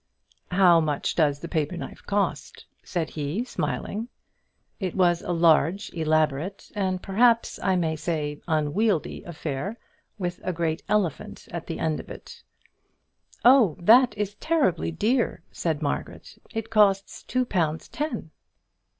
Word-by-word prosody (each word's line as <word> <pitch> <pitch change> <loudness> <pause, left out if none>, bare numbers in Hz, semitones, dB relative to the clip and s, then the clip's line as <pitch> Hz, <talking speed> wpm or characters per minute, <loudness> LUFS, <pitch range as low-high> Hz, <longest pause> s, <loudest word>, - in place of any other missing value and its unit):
"How 180 -2 +5
much 150 -3 -1
does 150 -4 +2
the 170 - -5
paper 160 +1 -1
knife - - -8
cost?" 205 0 -2 0.2
said 170 -3 -3
he, 155 +9 -2
still 255 - -13
smiling. 220 +3 -3 0.7
It 185 -4 -3
was 175 -3 +3
a - - -4
large, 170 +4 +3
elaborate, 155 +2 0
and 190 -3 -1
perhaps, 230 +4 +3
I 190 - +2
may 165 -3 0
say, 150 -2 -3
unwieldy 165 +4 0
affair, 170 - -4 0.4
with 180 -3 -3
a 185 - -1
great 165 -1 -1
elephant 200 -8 -1
at 170 -1 -6
the 165 - -4
end 160 -1 -1
of - - -10
it. - - -10 1.0
"Oh! 245 - +6
that 235 +7 +5
is 205 -1 -2
terribly 275 - +1
dear," 215 +4 0
said 160 -2 -2
Margaret, 145 - -4 0.2
"it 225 -1 -5
costs 200 -3 +3
two 255 0 -1
pounds 165 -7 -1
ten." 300 +2 -4
175 Hz, 140 wpm, -25 LUFS, 160-210 Hz, 1.0 s, Oh